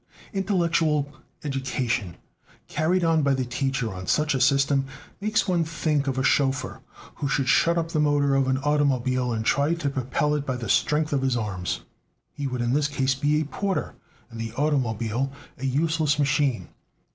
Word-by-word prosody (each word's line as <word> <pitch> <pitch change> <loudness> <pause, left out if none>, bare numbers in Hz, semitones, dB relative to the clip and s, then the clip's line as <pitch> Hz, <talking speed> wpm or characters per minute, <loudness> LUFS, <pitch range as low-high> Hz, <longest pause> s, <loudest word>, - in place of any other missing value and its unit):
Intellectual 170 -7 +1 0.3
education 130 - -2 0.5
carried 175 +3 +1
on 165 -1 +3
by 140 -1 +2
the 130 -1 -1
teacher 125 -2 -2
on 90 -1 -7
such 150 0 +2
a 135 - 0
system 135 +1 +3 0.3
makes 215 +2 +1
one 175 -3 +2
think 155 -3 -1
of 130 -1 -1
a 130 - +1
chauffeur 135 -1 +1 0.4
who 145 - -2
should 135 -1 0
shut 170 +5 +4
up 165 -1 -1
the 160 - -1
motor 145 -2 +2
of 135 -1 +2
an 130 0 +2
automobile 130 -3 +1
and 110 -1 -2
try 145 +7 +2
to 150 -5 -2
propel 135 +3 0
it 150 -2 0
by 130 -2 -2
the 120 -4 -5
strength 150 +5 +2
of 140 - +1
his 130 -2 +1
arms. 100 -5 -3 0.5
He 145 - -4
would 125 -2 -3
in 120 +1 0
this 145 +1 +2
case 135 -2 0
be 145 +3 +1
a - - -2
porter, 195 +6 -2 0.4
and 115 - -8
the 115 0 -5
automobile 125 -3 0 0.3
a 135 - -2
useless 155 +2 +1
machine. 140 -3 +1
140 Hz, 180 wpm, -25 LUFS, 130-150 Hz, 0.5 s, shut